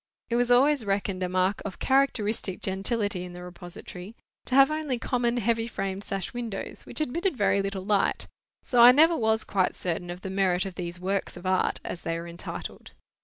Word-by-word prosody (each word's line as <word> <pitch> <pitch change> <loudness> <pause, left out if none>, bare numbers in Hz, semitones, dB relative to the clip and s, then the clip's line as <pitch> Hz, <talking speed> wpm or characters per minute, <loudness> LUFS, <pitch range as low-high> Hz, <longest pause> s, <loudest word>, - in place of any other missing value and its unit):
It - - +2
was 245 0 +2
always 270 +2 +4
reckoned 195 -2 -1
a 180 - -1
mark 185 +2 +1
of 200 -3 -6
characteristic 225 -8 +1
gentility 195 0 -1
in 180 -1 -8
the 180 0 -9
repository, 180 +3 -10 0.3
to 260 - -1
have 275 +1 +7
only 305 -5 -1
common 240 0 0
heavy 230 0 +1
framed 195 -3 -4
sash 195 -3 -4
windows, 235 -5 -6
which - - -4
admitted 335 +3 -1
very 200 -1 +2
little 195 -1 -4
light, 205 0 +1 0.4
so 245 -3 +3
I 245 +1 +10
never 320 +5 +6
was 220 -4 +1
quite 190 -2 0
certain 175 0 -3
of 175 +1 -6
the 190 - -5
merit 190 -2 +1
of 190 - -5
these 175 0 -6
Works 190 0 -2
of 175 - -11
Art 185 0 +1
as 175 - -5
they 165 0 -2
were 170 - -7
entitled. 170 +1 -8
200 Hz, 195 wpm, -27 LUFS, 185-240 Hz, 0.4 s, I